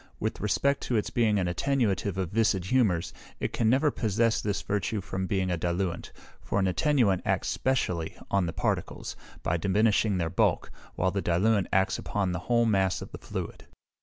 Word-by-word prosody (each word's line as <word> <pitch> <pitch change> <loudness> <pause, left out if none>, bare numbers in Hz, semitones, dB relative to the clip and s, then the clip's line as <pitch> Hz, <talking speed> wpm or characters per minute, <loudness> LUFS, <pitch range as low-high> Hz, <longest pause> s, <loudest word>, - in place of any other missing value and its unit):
With - - -3
respect 140 +7 +1
to 125 - 0
its 105 - 0
being 110 -3 +2
an 95 - +1
attenuative 100 -2 0
of 95 -3 -2
viscid 100 -4 +1
humours, 95 -7 +1 0.3
it - - -3
can 110 - +2
never 140 +5 +3
possess 115 0 +1
this 105 -1 -2
virtue 105 +1 -1
from 95 0 -4
being 95 -2 0
a 90 - 0
diluent, 85 +1 -2 0.3
for - - -2
an 100 - +2
attenuant 115 - +2
acts - - 0
specially 90 -11 -1
on 100 -3 +2
the - - -2
particles, - - -2 0.3
by 85 - +1
diminishing 100 +2 +2
their 85 -2 -1
bulk, - - +1 0.2
while 95 +1 +1
the 100 - -1
diluent 95 +3 +2
acts 95 0 +2
upon 100 -3 -1
the 90 - -2
whole 120 -1 +4
mass 95 -4 +1
of - - -11
the - - -8
fluid. - - -6
100 Hz, 185 wpm, -28 LUFS, 90-115 Hz, 0.3 s, whole